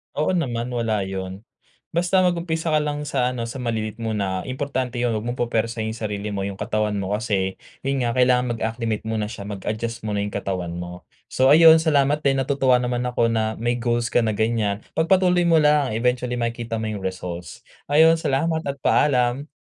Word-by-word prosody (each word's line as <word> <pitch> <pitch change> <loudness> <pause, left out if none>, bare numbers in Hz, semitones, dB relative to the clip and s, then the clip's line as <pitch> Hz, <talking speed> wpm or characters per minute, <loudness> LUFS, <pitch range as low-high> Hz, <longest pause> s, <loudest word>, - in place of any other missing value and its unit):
Oo 150 - +1
naman, 125 -9 -1
wala 115 -4 0
'yun. 95 +1 -6 0.5
Basta 180 +3 +2
mag-umpisa 170 -2 0
ka 155 - +4
lang 150 0 -2
sa 130 -4 +1
ano, 120 - -3
sa 125 +3 -7
maliliit 110 -2 -3
muna. 100 -5 -2
Importante 130 -1 -3
'yun 120 -1 +1
'wag 110 +1 -3
mong 120 - -2
pupuwersahin 115 -1 -1
yung 115 - -9
sarili 105 0 -4
mo, 100 -1 -3
yung 100 - -5
katawan 105 -1 -1
mo 100 -1 -3
kasi 100 -4 -1 0.2
'yun 135 0 0
nga, 120 -1 -1
kailangan 125 -1 +3
mag-acclimate 115 -1 -2
muna 110 -1 -2
siya, 105 -2 -8
mag-adjust 110 +3 -4
muna 105 -1 -1
yung 105 - -4
katawan 95 -3 -3
mo. 90 0 -7 0.2
So 130 +1 +3
ayun, 160 +1 +8
salamat 150 -1 +2
din. 135 -1 +2
Natutuwa 135 -1 +2
naman 125 0 -1
ako 125 -1 +1
na 110 -1 -1
may 120 +1 0
goals 120 -1 0
ka 120 - +3
na 110 - +1
ganyan. 110 -2 0 0.2
Pagpatuloy 180 +1 +3
mo 165 -1 +5
lang. 150 -3 +3
Eventually, 125 +1 0
makikita 115 -1 -3
mo 110 - -3
yung 100 -2 -6
results. 90 -2 -5 0.3
Ayon 160 +2 +6
salamat 160 +2 0
at 140 0 -4
paalam. 130 0 +2
120 Hz, 185 wpm, -23 LUFS, 110-140 Hz, 0.5 s, ayun